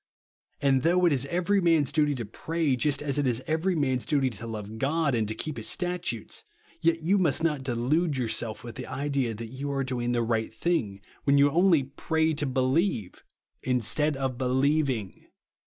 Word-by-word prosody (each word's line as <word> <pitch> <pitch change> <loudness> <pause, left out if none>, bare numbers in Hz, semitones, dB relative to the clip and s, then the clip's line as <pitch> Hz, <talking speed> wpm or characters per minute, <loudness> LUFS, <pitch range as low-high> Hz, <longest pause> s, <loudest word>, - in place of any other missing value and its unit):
And 135 -2 +3
though 180 +4 +3
it 170 - +4
is 135 0 -2
every 180 +5 +1
man's 165 -6 +3
duty 150 -2 +2
to 120 -3 -4
pray, 155 +6 -1
just 145 +3 0
as 145 -1 -1
it 145 - +1
is 125 +1 -1
every 165 +4 0
man's 130 -5 0
duty 135 +2 +1
to 115 +1 -8
love 110 -1 -6
God 150 +2 +1
and 110 -3 +1
to 110 - -3
keep 155 +4 -5
his 110 - -3
statutes, 175 - -3 0.4
yet 165 0 +1
you 195 +5 +3
must 160 -3 +1
not 150 -4 +1
delude 135 +5 0
yourself 115 -1 -1
with 120 -1 -7
the - - -6
idea 135 -3 -1
that 115 +1 -7
you 140 +2 -4
are 135 -1 -1
doing 125 -2 -2
the 120 -1 +1
right 115 -1 -1
thing, 110 - -1 0.2
when 140 0 +4
you 140 0 +5
only 170 -2 +4
2'>'>'C('y 160 +3 0
to 145 - 0
5e 130 0 +1
lieve, 160 - -1 0.4
instead 130 +4 0
of 130 -2 -2
helievlng. 130 -4 0
135 Hz, 190 wpm, -27 LUFS, 120-160 Hz, 0.4 s, you